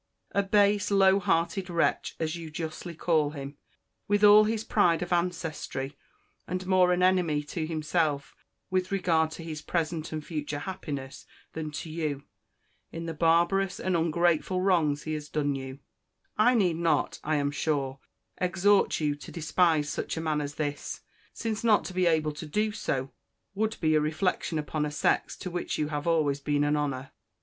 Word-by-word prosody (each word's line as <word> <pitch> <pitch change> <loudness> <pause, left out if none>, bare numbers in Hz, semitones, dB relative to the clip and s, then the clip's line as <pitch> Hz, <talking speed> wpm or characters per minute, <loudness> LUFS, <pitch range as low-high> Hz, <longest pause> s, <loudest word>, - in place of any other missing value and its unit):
A 200 - +2
base, 205 0 +3
low 195 -1 +5
hearted 180 +1 0
wretch, 170 -1 0
as 160 0 -1
you 165 -2 -7
justly 160 +2 -6
call 155 -3 +2
him, 140 -1 -8 0.5
with 205 0 +2
all 210 +1 +8
his 220 0 -1
pride 175 -7 +2
of 175 - -2
ancestry; 165 -6 -2 0.5
and 185 0 -3
more 185 -1 +4
an 180 0 +2
enemy 175 -5 +2
to 155 +2 -4
himself 155 -2 -1 0.4
with 185 0 0
regard 165 -5 +2
to 165 +1 -8
his 155 -2 -6
present 165 -1 -2
and 155 -1 -5
future 150 -3 -4
happiness 145 -5 -6 0.3
than 160 -1 -4
to 160 - -6
you, 155 -4 -3 0.7
in 165 0 -6
the 165 - -3
barbarous 170 +5 +2
and 185 -1 0
ungrateful 170 +2 +1
wrongs 165 -6 +2
he 155 - -3
has 150 -1 -5
done 145 -2 0
you: 135 0 -6 0.6
I 245 +4 +4
need 180 -7 +2
not, 170 -1 +1
I 155 +1 0
am 145 -1 0
sure, 140 -3 -1 0.4
exhort 195 +3 +3
you 150 -2 +1
to 145 - -10
despise 160 -2 +2
such 150 - -3
a - - -2
man 155 -2 0
as 145 0 -5
this, 145 -2 -4 0.3
since 225 -1 -3
not 220 -3 +4
to 185 - -6
be 180 -1 +2
able 155 -2 +2
to 150 +1 -8
do 210 +7 0
so, 135 -10 -3 0.4
would 220 +2 -1
be 155 -2 +2
a 155 - +4
reflection 160 +2 -1
upon 150 0 -2
a 150 - -1
sex 150 - 0
to 180 - -6
which 175 0 -3
you 150 -1 -1
have 150 +1 -3
always 150 -4 +2
been 145 0 0
an 145 0 +2
honour. 140 -3 -2
165 Hz, 175 wpm, -28 LUFS, 150-185 Hz, 0.7 s, all